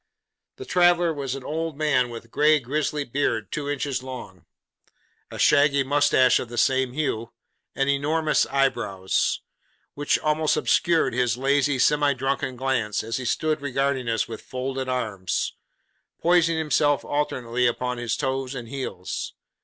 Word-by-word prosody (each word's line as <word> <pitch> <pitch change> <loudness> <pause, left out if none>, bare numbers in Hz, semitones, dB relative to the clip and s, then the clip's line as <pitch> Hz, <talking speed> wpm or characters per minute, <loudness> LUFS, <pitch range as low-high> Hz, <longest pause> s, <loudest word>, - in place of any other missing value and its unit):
The 400 - -9
traveller 175 - +3
was 135 -3 -4
an 135 - -8
old 160 0 -3
man 140 -5 +2
with 115 -1 -8
a - - -20
grey 150 +5 +3
gristly 145 +3 -2
beard 115 -6 -2
two 145 -1 -3
inches 140 -2 -2
long, 120 - -9 0.8
a - - -8
shaggy 140 -1 +4
moustache 135 -2 +3
of 120 - -6
the 120 - -8
same 130 +1 +2
hue, 120 -6 -2 0.4
and 135 - 0
enormous 150 +3 +1
eyebrows; 120 -9 0 0.5
which 145 0 +1
almost 155 0 +1
obscured 170 -6 +2
his 125 -1 +1
lazy, 140 +1 +2
semi 145 +2 +3
drunken 135 0 -2
glance, 120 -5 -1
as 115 +1 -3
he 130 - -5
stood 155 +4 0
regarding 135 -2 -1
us 115 -1 0
with 110 -1 -7
folded 130 0 -4
arms: 105 -8 -2 0.7
poising 170 -1 +3
himself 150 -2 +1
alternately 125 -4 0
upon 125 +1 -2
his 120 -1 -2
toes 135 -1 -2
and 120 -3 -7
heels. 110 -9 -5
135 Hz, 145 wpm, -24 LUFS, 125-145 Hz, 0.8 s, shaggy